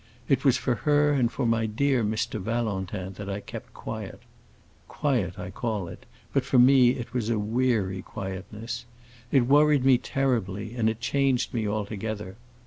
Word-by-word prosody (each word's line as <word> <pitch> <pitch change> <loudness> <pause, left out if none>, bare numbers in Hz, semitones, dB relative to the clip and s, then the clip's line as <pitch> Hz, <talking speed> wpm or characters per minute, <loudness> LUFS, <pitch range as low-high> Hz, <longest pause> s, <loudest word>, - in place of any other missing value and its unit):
It 135 -2 +2
was 130 -3 +4
for 130 - 0
her 145 +3 +2
and 125 -4 +2
for 135 - -2
my 115 -1 +2
dear 130 +3 +1
Mr. 110 0 -1
Valentin 100 -3 -2 0.2
I 100 +1 -2
kept - - -9
quiet. 110 0 -6 0.7
Quiet 115 - -1
I 90 0 -6
call 105 -6 -3
it, - - -11 0.3
but - - +2
for - - +1
me 125 0 +6
it 120 0 -7
was 120 -3 -1
a 115 - +1
weary 105 -3 0
quietness. 100 +5 -6 0.5
It 135 -4 +4
worried 145 0 +4
me 130 -2 +6
terribly, 110 -7 -1
and 110 -2 +2
it 110 +1 -4
changed 130 -1 +1
me 110 -3 -1
altogether. 105 -1 -4
115 Hz, 160 wpm, -26 LUFS, 105-130 Hz, 0.7 s, me